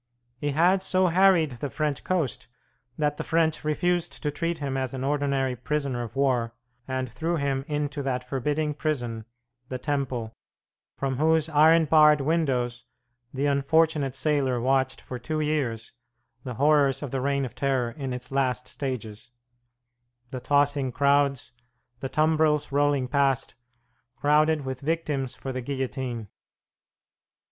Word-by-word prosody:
He 145 - -1
had 175 +6 +3
so 185 -1 +2
harried 180 -5 +4
the 145 - -3
French 150 0 -2
coast 165 - -1 0.5
that 150 -1 0
the - - -3
French 160 -1 +1
refused 175 +3 -1
to 150 - 0
treat 165 +3 -2
him 140 -3 -3
as 130 -1 -2
an 130 - -4
ordinary 140 -2 0
prisoner 135 0 -2
of 115 -2 -7
war, 125 -4 +1 0.3
and 130 -1 -2
threw 165 +8 -2
him 140 -3 -1
Into 145 -1 -2
that 125 -2 -3
forbidding 150 +4 -1
prison, 120 -8 -3 0.4
the 130 - -3
Temple, 125 -5 -3 0.6
from 135 -2 -2
whose 160 +1 +2
iron 160 +2 +5
barred 150 -1 +6
windows 135 -6 0 0.5
the 135 +1 -2
unfortunate 145 0 +2
sailor 135 -3 +1
watched 130 +1 +1
for 125 - -7
two 155 +5 -3
years 140 -7 -1 0.5
the 125 -2 -6
horrors 145 +1 +3
of 140 - -5
the 135 - -2
Reign 140 0 0
of 125 - -8
Terror 130 -4 0
in 135 +1 -5
its 125 +1 -6
last 130 -2 0
stages, 120 -5 -5 1.0
the 130 - -4
tossing 140 0 +1
crowds, 140 0 +2 0.5
the 135 - -4
tumbrils 155 0 +2
rolling 145 -2 +2
past, 135 -1 +1 0.6
crowded 150 +1 +2
with 130 -1 -5
victims 145 -4 -2
for 135 - -6
the 130 - -3
guillotine. 130 -3 -4
140 Hz, 140 wpm, -26 LUFS, 130-150 Hz, 1.0 s, barred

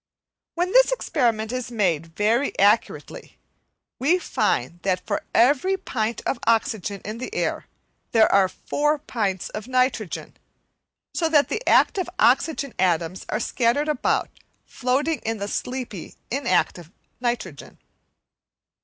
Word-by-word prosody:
When 355 +2 0
this - - +6
experiment 235 - 0
is 255 -1 -3
made 180 -9 0
very 230 +6 +1
accurately, 205 +3 +1 0.6
we 315 +8 +3
find 175 - -1
that 185 -2 -1
for 310 - -1
every 290 +11 +4
pint 230 - -3
of - - -1
oxygen 215 -3 0
in 215 +3 -5
air - - -2 0.4
there 225 -2 +5
are 195 -2 +5
four 295 +8 0
pints 200 -9 -3
of 215 +2 -7
nitrogen, 255 -6 -1 0.8
so 325 -2 0
that 295 -3 +4
the 445 - -2
active 375 -3 +3
oxygen 275 +1 +2
atoms 175 0 0
are 215 - -1
scattered 240 +5 +1
about, 300 -4 0 0.3
floating 275 +5 -1
in 225 0 -3
the 200 0 -4
sleepy, 250 -4 -5 0.2
inactive 235 - 0 0.3
nitrogen. 235 - -4
235 Hz, 120 wpm, -23 LUFS, 205-285 Hz, 0.8 s, this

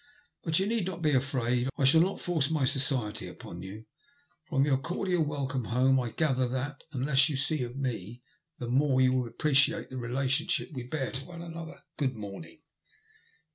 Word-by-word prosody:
But 160 -2 +1
you 190 - +2
need 215 -3 0
not 175 -2 -5
be 155 - +3
afraid, 125 -2 +1
I 140 - +2
shall 160 +5 +7
not 190 +3 0
force 160 -6 0
my 155 -4 +1
society 130 -5 +2
upon 85 - -9
you. 100 +4 -9 0.6
From 135 -2 +2
your 135 -3 +2
cordial 175 +3 0
welcome 140 -4 -2
home, 130 +4 +3
I 120 -2 -2
gather 130 -1 +1
that, 130 +3 -4
the 140 - -7
less 135 +3 +4
you 145 - -2
see 145 +2 +2
of 120 +1 -5
me 120 -3 -4 0.3
the 120 - -5
more 130 +2 +2
you 130 0 +4
will 125 -2 0
appreciate 150 +5 +2
the 130 - -5
relationship 135 +9 0
we 125 -3 -6
bear 135 -1 -2
to 135 +1 -5
one 170 -1 -9
another. 165 -1 -8
Good 135 -3 0
morning." 105 - -9
135 Hz, 185 wpm, -29 LUFS, 125-155 Hz, 0.6 s, shall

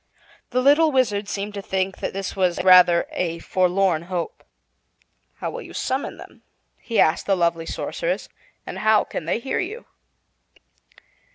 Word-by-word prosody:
The 255 +1 0
little 300 +3 +5
Wizard 210 -7 +1
seemed 205 +1 -4
to 200 - -5
think 190 0 -2
that - - -3
this 195 0 -5
was 185 -3 0
rather 180 -2 +6
a 170 -2 -2
forlorn 180 -1 +1
hope. 175 -2 -4 0.9
"How - - -4
will - - -6
you - - -11
summon 265 +2 -3
them," - - -14 0.4
he 230 - -2
asked 160 - +3
the 195 -1 +2
lovely 170 -1 0
Sorceress, - - -3 0.4
"and - - -6
how 215 0 +4
can 155 - -6
they 170 - 0
hear 240 +3 -3
you?" 425 +6 -5
195 Hz, 155 wpm, -23 LUFS, 175-235 Hz, 0.9 s, rather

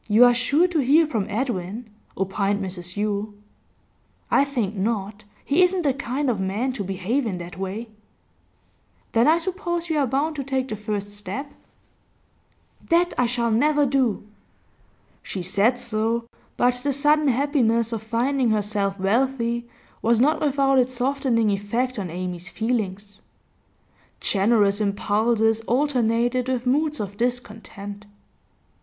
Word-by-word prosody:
'You 220 +3 +6
are 245 - +6
sure 285 +8 +3
to 340 -3 0
hear 295 +5 +4
from 225 -10 -2
Edwin,' 220 -1 -3 0.3
opined 195 +1 0
Mrs 180 -2 -6
Yule. 205 0 -2 1.0
'I 280 - +4
think 235 -8 -2
not. 205 0 -2 0.2
He 295 +6 +3
isn't 360 0 +3
the 280 -3 +2
kind 275 +2 -3
of 235 -6 0
man 205 +8 -1
to 215 - -4
behave 195 +8 -1
in 190 -4 -3
that 175 0 -8
way.' 195 +5 -4 1.2
'Then 230 +3 +3
I 320 +2 +5
suppose 345 -1 -3
you 310 - +1
are 275 - +2
bound 290 +5 -1
to 275 - -2
take 265 -1 -2
the 215 - -3
first 205 -1 -4
step?' 205 +8 -6 1.4
'That 345 +1 +3
I 250 -1 +2
shall 235 -1 0
never 290 +6 +3
do.' 260 -6 +1 1.0
She 185 - -5
said 200 +7 +3
so, 230 0 -1 0.3
but 245 +1 +3
the 280 +3 -1
sudden 295 +2 +3
happiness 240 -4 +2
of 225 - -3
finding 240 +3 0
herself 205 -2 0
wealthy 235 +3 0 0.3
was 230 0 +3
not 295 +6 +3
without 275 -2 +3
its 255 0 +1
softening 245 -4 +1
effect 230 +5 -1
on 190 -3 -4
Amy's 180 +1 -5
feelings. 205 -2 -3 1.0
Generous 205 0 +2
impulses 220 +2 +1
alternated 245 -2 +1
with 255 -1 -1
moods 300 +4 +1
of 200 -1 -5
discontent. 210 -4 -4
235 Hz, 140 wpm, -23 LUFS, 205-270 Hz, 1.4 s, You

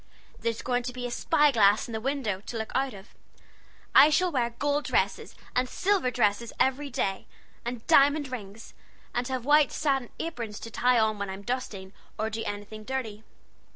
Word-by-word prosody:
There's 230 -1 -2
going 245 -1 0
to 250 +1 -5
be 250 0 -5
a 245 - -4
spy 295 +3 +3
glass 210 -3 +4
in - - -8
the 220 -1 -3
window, 245 -7 -2
to 235 - -4
look 220 0 -4
out 265 -3 0
of. 195 +1 -14 0.8
I 295 - +9
shall 360 +4 +2
wear 245 -5 +1
gold 290 +5 -1
dresses - - 0 0.2
and 250 0 +1
silver 380 -6 +1
dresses 230 -1 +1
every 275 +2 +1
day, 195 -6 -2 0.4
and 240 -1 -5
diamond 285 -2 +4
rings, 220 -2 -8 0.4
and 245 0 -1
have 260 -2 -3
white 295 -1 +5
satin 270 -5 0
aprons 235 -10 -5
to 230 - -8
tie 250 0 +3
on 220 -2 +2
when 200 -1 -3
I'm 190 +1 -7
dusting, 205 -6 -4 0.2
or 220 +1 -2
doing 225 +1 -4
anything 205 +1 -6
dirty. 220 -4 -4
245 Hz, 185 wpm, -28 LUFS, 215-270 Hz, 0.8 s, I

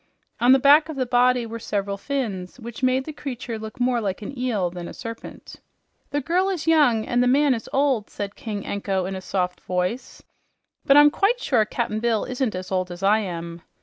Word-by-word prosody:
On 245 +2 +5
the 265 - +8
back 290 +4 +5
of 315 - -5
the 260 -1 -1
body 245 0 +3
were 230 0 -6
several 200 -2 -2
fins, 205 -5 -4
which 235 +1 -9
made 260 +1 +2
the 310 - -6
creature 250 -5 -6
look 220 +2 -9
more 245 -1 +1
like 200 -1 -3
an 240 - -7
eel 225 -9 -1
than 175 -1 -7
a - - -9
serpent. 230 0 -9 0.5
"The 290 +1 -1
girl 360 +7 +1
is 360 -5 -3
young 290 -9 +4
and 245 -1 +1
the 250 - +3
man 280 +2 +4
is 225 -3 -5
old," 270 -6 +1
said 200 0 -6
King 210 -3 -5
Anko 195 -2 -2
in 190 +1 -4
a 190 - -6
soft 180 -1 -2
voice. 180 +7 -3 0.6
"But 275 - +7
I'm 295 0 +8
quite 430 +9 +1
sure 240 - +2
Cap'n 215 -1 -2
Bill 230 -1 0
isn't 250 -4 -2
as 185 +1 -6
old 185 -1 0
as 175 +2 -8
I 210 +3 +4
am." 170 -4 -6
230 Hz, 215 wpm, -23 LUFS, 200-265 Hz, 0.6 s, the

